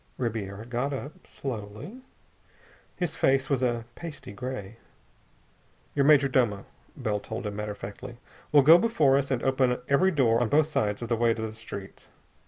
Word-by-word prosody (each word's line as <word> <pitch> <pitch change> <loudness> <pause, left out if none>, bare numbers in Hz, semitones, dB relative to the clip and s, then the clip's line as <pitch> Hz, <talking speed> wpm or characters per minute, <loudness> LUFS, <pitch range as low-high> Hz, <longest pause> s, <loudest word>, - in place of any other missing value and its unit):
Ribiera 110 -3 -4
got 125 +4 -2
up. 140 +2 -8
Slowly. 125 - -7 0.9
His 175 -4 -2
face 135 +1 +2
was 135 -2 +2
a 120 -2 0
pasty 160 -9 -9
gray. 115 -1 -6 1.2
"Your 140 -1 +2
major 145 -2 +6
domo," 120 -7 +1 0.3
Bell 105 -1 -1
told 100 - -6
him 105 -1 -4
matter 105 0 -3
of - - -16
factly, 100 +4 -8 0.3
"will 145 -2 +6
go 160 +5 +8
before 160 -13 +3
us 140 0 +1
and 130 -3 -1
open 130 -2 +2
every 160 +7 +4
door 125 -9 +3
on 120 - +1
both 150 +1 +4
sides 110 -8 -1
of 115 - -5
the 120 - +2
way 115 0 +2
to 110 - -5
the 110 -1 -4
street. 100 -3 -9
125 Hz, 175 wpm, -27 LUFS, 110-140 Hz, 1.2 s, go